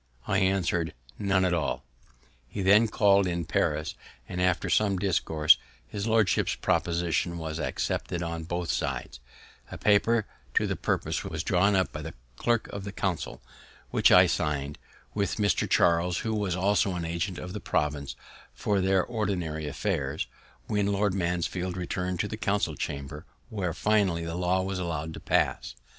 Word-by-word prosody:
I - - +1
answer'd, 90 -3 +1 0.2
"None 95 -2 +2
at 90 - +1
all." 85 -4 -1 0.6
He 100 +9 -4
then 105 +4 +6
call'd 100 -2 +4
in 85 -1 -2
Paris, 75 +1 0 0.3
and 90 - -4
after 90 -1 +2
some 100 -3 +2
discourse, 80 -5 +3 0.3
his 100 - -4
lordship's 110 -4 +2
proposition 85 0 0
was 80 -1 -4
accepted 85 +2 -2
on 85 -1 -4
both 85 0 -2
sides; - - -3 0.5
a - - -6
paper 105 +2 +3 0.3
to - - +3
the - - -1
purpose - - -1
was - - -4
drawn 100 +3 +3
up 95 -1 +1
by 75 - -6
the 80 +2 -7 0.2
Clerk 120 - +1
of 100 - -6
the 100 - -5
Council, 95 -10 -3 0.5
which - - +4
I - - +8
sign'd 75 -1 -1 0.3
with 100 -2 0
Mr. 105 -2 +1
Charles, 85 +1 +3
who 110 - 0
was 100 -4 0
also 95 0 +2
an 85 -1 -3
Agent 85 +2 -2
of 90 0 -6
the - - -4
Province 75 -2 -1 0.4
for 100 -2 0
their 95 0 +3
ordinary 90 -9 -2
affairs, 75 - -2 0.4
when 105 -1 0
Lord 100 -1 +1
Mansfield 90 0 -1
returned 90 0 -2
to 105 - -2
the 110 - -5
Council 100 -6 0
Chamber, 75 +3 -5 0.2
where 95 -5 -2
finally 95 -3 +1
the 85 - -4
law 90 +1 +1
was 95 0 -3
allowed 80 -3 -3
to - - -7
pass. - - 0
90 Hz, 160 wpm, -28 LUFS, 85-100 Hz, 0.6 s, I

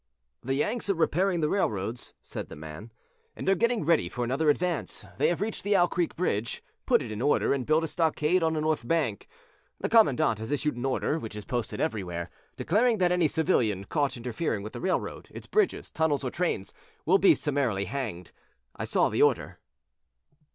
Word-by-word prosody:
"The 135 +2 -1
Yanks 210 - -1
are 195 - +3
repairing 175 +2 +1
the 150 - +1
railroads," 115 - -2
said - - -7
the - - -8
man, 80 +9 -9 0.4
"and - - -6
are 195 - +6
getting 235 0 +1
ready 160 - +3
for 125 +5 -3
another 135 +6 +1
advance. 170 +3 -1
They - - +4
have 175 +2 0
reached 215 +1 -2
the 205 +1 +2
Owl 175 -2 +4
Creek 175 -2 -1
bridge, 115 - -1 0.2
put - - +4
it - - -7
in 105 +1 -4
order 145 - +2
and 135 -3 -3
built 155 +1 +3
a - - -1
stockade 160 +2 +1
on 160 -1 +2
the 155 - -1
north 155 -6 -1
bank. 145 - 0 0.5
The - - -2
commandant 145 - +4
has 110 +1 -5
issued 145 0 0
an 120 +2 -4
order, 140 +4 0
which 110 -6 -7
is 105 -1 -7
posted 120 -3 -3
everywhere, 90 -5 -3 0.3
declaring 225 +7 +2
that 180 -2 +2
any 180 -3 +3
civilian 120 - +1
caught 145 +3 -1
interfering 120 -2 -2
with 110 - -7
the 120 - -6
railroad, 185 - -2
its - - -10
bridges, 425 -4 0
tunnels 155 -3 0
or 130 - -2
trains 170 - -2 0.3
will 190 +5 +4
be 195 - +6
summarily 135 -10 -1
hanged. 105 -6 -5 0.4
I - - -4
saw - - +2
the - - 0
order." - - +2
150 Hz, 195 wpm, -28 LUFS, 115-175 Hz, 0.5 s, are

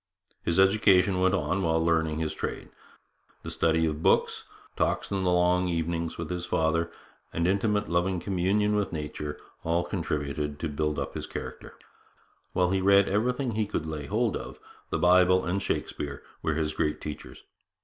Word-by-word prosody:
His 85 +2 0
education 95 -1 +4
went 95 +1 +3
on 95 0 0
while 80 -2 +2
he 80 - 0
learned 80 -2 +1
his 80 -1 -1
trade. - - -5 0.7
The 80 - -5
study 80 0 +2
of 75 -1 -2
books, - - +2 0.3
talks - - 0
in 95 -1 0
the 90 - +2
long 90 +1 +3
evenings 85 -1 -2
with 85 -1 -5
his 90 -1 -3
father, 85 +1 +1 0.4
and 85 +1 0
intimate 105 +2 +1
loving 90 +2 +1
communion 100 +4 +1
with 105 -2 0
nature, 75 -2 -5 0.2
all 85 +1 +1
contributed 75 -5 -3
to 80 - -3
build 75 +1 -1
up - - -3
his - - -5
character. - - -7 0.8
While 90 0 +2
he 95 0 +1
read 100 +1 +5
everything 125 +5 0
he 110 -1 -1
could 80 - -3
lay 75 -2 -5
hold 110 +1 +1
of, - - -7 0.3
the - - 0
Bible 90 +1 +5
and 95 +3 -1
Shakespeare 70 -6 -3 0.2
were 80 - 0
his 75 -1 -1
great 75 0 -1
teachers. 75 -1 -8
85 Hz, 170 wpm, -28 LUFS, 80-95 Hz, 0.8 s, read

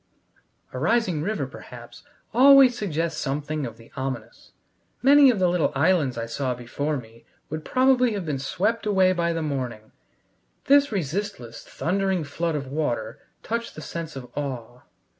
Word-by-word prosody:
A 130 - -4
rising 180 - +1
river, 190 -4 -2
perhaps, 120 -2 -12 0.3
always 265 0 +7
suggests 165 -6 -2
something 145 0 -2
of 115 -1 -10
the 115 - -17
ominous: 130 -4 -6 0.5
many 280 +1 +7
of 240 - +2
the 185 -1 +3
little 175 -2 +1
islands 145 -4 +2
I 115 - -2
saw 125 +2 -2
before 140 +5 -3
me 115 -2 -12 0.3
would 155 0 -4
probably 255 0 +3
have 200 -4 -4
been 145 -4 -2
swept 210 - -1
away 190 -2 +4
by 170 -1 0
the 165 -1 -2
morning; 125 -7 -4 0.7
this 285 -1 +5
resistless, 185 - -4
thundering 190 0 -1
flood 165 +3 -2
of 140 -2 -3
water 125 -6 -3 0.2
touched 230 +1 -3
the 155 - -8
sense 165 -1 -6
of 130 -2 -7
awe. 125 -4 -5
155 Hz, 155 wpm, -24 LUFS, 130-200 Hz, 0.7 s, always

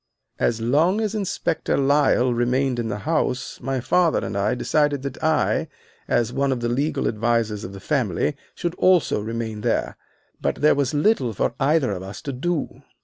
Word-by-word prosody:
"As 115 - +1
long 155 - +2
as 215 -2 -1
Inspector 200 -6 -1
Lyle 135 -3 +3
remained 125 +1 +1
in 115 - -2
the 110 - -3
house 150 -6 -1
my 135 +1 -2
father 170 +6 +2 0.4
decided 145 +1 +1
that 140 +1 -6
I, 155 -1 +1 0.4
as 120 0 +1
one 140 +1 +1
of 130 - -1
the 120 0 -1
legal 140 +6 0
advisers 110 -1 0
of 95 - -6
the 100 - -9
family, 130 - 0 0.2
should 175 -1 -2
also 180 - +3
remain 110 0 -4
there. - - -1 0.4
But - - 0
there 150 +2 +4
was 140 0 0
little 145 - +2
for - - -1
either 140 -2 +2
of 95 -2 -4
us 95 +2 -8
to 140 - -4
do. 160 +5 -3
135 Hz, 170 wpm, -23 LUFS, 115-150 Hz, 0.4 s, there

